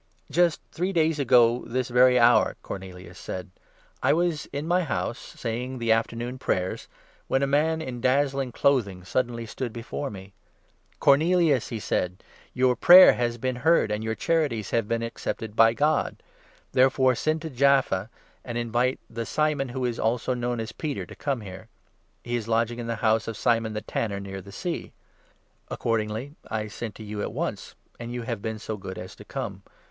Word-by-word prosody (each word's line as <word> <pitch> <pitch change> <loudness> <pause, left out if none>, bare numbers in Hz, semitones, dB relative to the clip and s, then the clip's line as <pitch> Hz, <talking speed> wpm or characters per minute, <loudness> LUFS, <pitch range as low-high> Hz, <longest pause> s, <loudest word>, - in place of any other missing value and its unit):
"Just 175 -2 +2
three 180 +3 -1
days 160 -3 +1
ago 125 -3 +4
this 125 +2 -2
very 125 +1 +5
hour," 120 0 +4
Cornelius 90 -1 -8
said, 95 0 -6 0.5
"I - - 0
30 - - +1
was 170 -3 0
in 145 +3 -5
my 180 +2 +3
house, 130 -5 -2
saying 125 +3 -5
the 115 -2 0
Afternoon 115 +3 -1
Prayers, 90 -6 -2 0.4
when 135 - +1
a - - +4
man 160 +3 +1
in 125 -4 -6
dazzling 135 0 +1
clothing 110 -9 +1
suddenly 120 +4 -2
stood 120 +2 -5
before 120 +5 -5
me. 95 -1 -10 0.7
'Cornelius,' 155 -2 +4
31 - - -5
he - - -3
said, 90 -2 -2
' - - -28
your 125 0 +3
prayer 180 +6 +9
has 120 -1 -1
been 125 +1 -2
heard, 150 -5 +3
and 105 +1 -2
your 110 0 -2
charities 145 - 0
have 115 -3 +1
been 115 +1 -1
accepted, 110 -1 -5
by 115 0 +6
God. 150 +5 0 0.5
Therefore 130 0 +4
send 155 +5 -1
to 160 - -5
Jaffa, 130 -7 +2 0.3
and 120 -1 -5
invite 120 +2 0
32 - - -24
the 115 0 -3
Simon, 150 -3 0
who 130 +1 -3
is 120 -2 -2
also 120 +3 0
known 120 -1 -2
as 110 0 -4
Peter, 145 +3 -4
to - - -12
come 135 -5 -2
here. 95 -2 -9 0.6
He 120 0 -2
is 115 -2 -3
lodging 115 +1 0
in 120 - -5
the 115 - -1
house 110 0 +3
of 115 -2 -4
Simon 115 -2 +1
the 105 - -3
tanner, 105 -1 -3
near 95 -1 -7
the 100 - -12
sea.' 170 - -4 0.8
Accordingly 115 +4 -2 0.2
I 110 -1 -3
sent 110 +1 -6
to 110 - -9
you 105 0 -5
at - - -3
once, - - -4 0.2
and 120 0 -6
you 120 -1 -4
have 115 -3 -4
been 110 0 -3
so 110 0 -5
good 95 -1 -7
33 - - -6
as 95 - -11
to - - -12
come. - - -5
120 Hz, 190 wpm, -26 LUFS, 110-135 Hz, 0.8 s, prayer